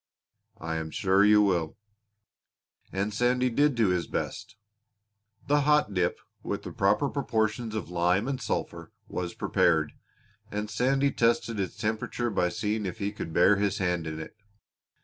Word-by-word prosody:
"I 80 0 -4
am 80 0 -4
sure 95 +4 +2
you 105 0 +6
will." 85 -6 0 1.1
And 100 +2 -2
Sandy 125 +3 +2
did 145 +3 +3
do 115 -4 +3
his 90 -2 0
best! - - -4 0.9
The 145 +1 +3
hot 150 -7 +3
dip, 90 -2 0 0.2
with - - -4
the - - -6
proper - - +2
proportions 110 0 -1
of 105 -4 -4
lime 90 +5 +1
and 135 -2 -3
sulphur, - - -4 0.2
was 90 -1 -4
prepared, 80 -2 +2 0.6
and 105 +1 -4
Sandy 135 +2 +2
tested 115 -2 +1
its 95 - -3
temperature 110 +2 -2
by 90 -3 +1
seeing 105 +3 -2
if 95 - -5
he 100 -2 -2
could 105 -5 -6
bear 90 +5 +5
his 100 0 0
hand 90 -3 -1
in 80 0 -5
it. 80 - -9
105 Hz, 155 wpm, -28 LUFS, 90-115 Hz, 1.1 s, you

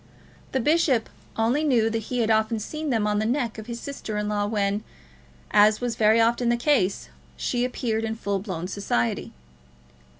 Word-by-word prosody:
The 265 - 0
bishop 285 -4 +2 0.3
only 235 +7 +2
knew 245 -7 +3
that 225 -1 -2
he 250 -1 0
had 225 -1 +2
often 220 +1 +2
seen 305 +8 -4
them 225 -5 +1
on 210 0 +1
the - - 0
neck 240 -3 -1
of 220 - -9
his 235 -1 -5
sister 235 -6 -5
in 210 0 -1
law 205 -1 0
when, 205 -1 0 0.7
as 210 +1 +5
was 245 -2 -2
very 220 +1 +4
often 235 +1 +2
the 240 - +2
case, 240 -7 +1 0.3
she 245 -1 -1
appeared 235 -3 -1
in 225 0 -2
full 200 -3 -2
blown 185 -4 -5
society. 150 - -1
225 Hz, 180 wpm, -25 LUFS, 210-245 Hz, 0.7 s, as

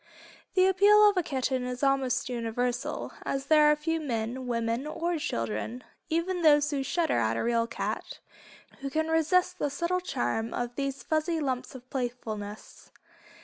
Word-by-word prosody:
The 370 -1 +5
appeal 405 +3 +6
of 410 - +4
the 365 - +1
kitten 260 -4 -1
is 250 +1 -4
almost 270 -3 +1
universal, 245 +3 -2
as 275 0 -2
there 300 0 +6
are - - +4
few 325 +2 -1
men, 250 -2 -3
women 230 +3 -1
or 340 +2 -2
children, 115 - -3 0.3
even 345 +3 0
those 295 -2 +5
who 280 -2 -1
"shudder" 320 - +1
at 115 0 +1
a - - -1
real 230 -1 +1
cat, 235 - -4 0.6
who 275 - -4
can 315 +3 -1
resist 360 +3 +2
the 290 - 0
subtle 340 +6 -1
charm 225 - -2
of 240 0 -3
these 275 0 -3
fuzzy 315 +1 0
lumps 260 -3 -3
of 255 -1 -11
playfulness. 220 -5 -5
275 Hz, 160 wpm, -28 LUFS, 235-320 Hz, 0.6 s, appeal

